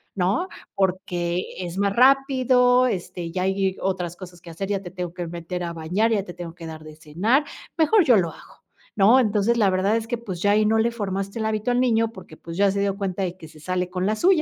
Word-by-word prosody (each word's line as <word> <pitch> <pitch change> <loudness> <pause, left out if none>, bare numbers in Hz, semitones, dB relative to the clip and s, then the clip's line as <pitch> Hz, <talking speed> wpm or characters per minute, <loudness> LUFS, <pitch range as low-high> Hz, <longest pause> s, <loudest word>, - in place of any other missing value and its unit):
¿no?, 200 - 0 0.3
porque 180 -2 -1
es 180 0 -5
más 200 0 +1
rápido, 255 -1 +4
este, 175 -5 -4
ya 180 +1 -2
hay 190 0 0
otras 180 -3 -2
cosas 175 -2 -11
que 170 - -12
hacer, 195 +4 -5
ya 200 -1 -1
te 175 - -9
tengo 180 -2 -5
que 175 -1 -5
meter 175 +1 -5
a 170 -1 -4
bañar, 180 +8 0
ya 205 -3 +1
te 175 - -9
tengo 170 -2 -8
que 170 -2 -10
dar 155 -1 -9
de 155 0 -11
cenar, 190 - +1 0.3
mejor 345 +5 +4
yo 250 - +6
lo 170 -3 +1
hago, - - -17 0.3
¿no?, 220 +6 +6
entonces, 220 0 +2
la 210 -4 +4
verdad 190 +4 +1
es 225 0 -4
que, 240 0 -2
pues, 190 -7 -6
ya 205 - +3
ahí 215 +1 +3
no 225 - +3
le 230 +2 +2
formaste 200 -1 -4
el 220 - -1
hábito 220 +2 -1
al 245 - +2
niño, 230 -3 +2
porque, 185 -6 -13
pues, 165 0 -9
ya 200 0 +4
se 200 - -2
dio 200 -1 0
cuenta 195 -1 -2
de 180 -1 -3
que 160 - -11
se 155 0 -16
sale 180 +3 -2
con 180 0 -2
la 215 +2 +1
suya, 350 - +3
195 Hz, 245 wpm, -23 LUFS, 175-225 Hz, 0.3 s, yo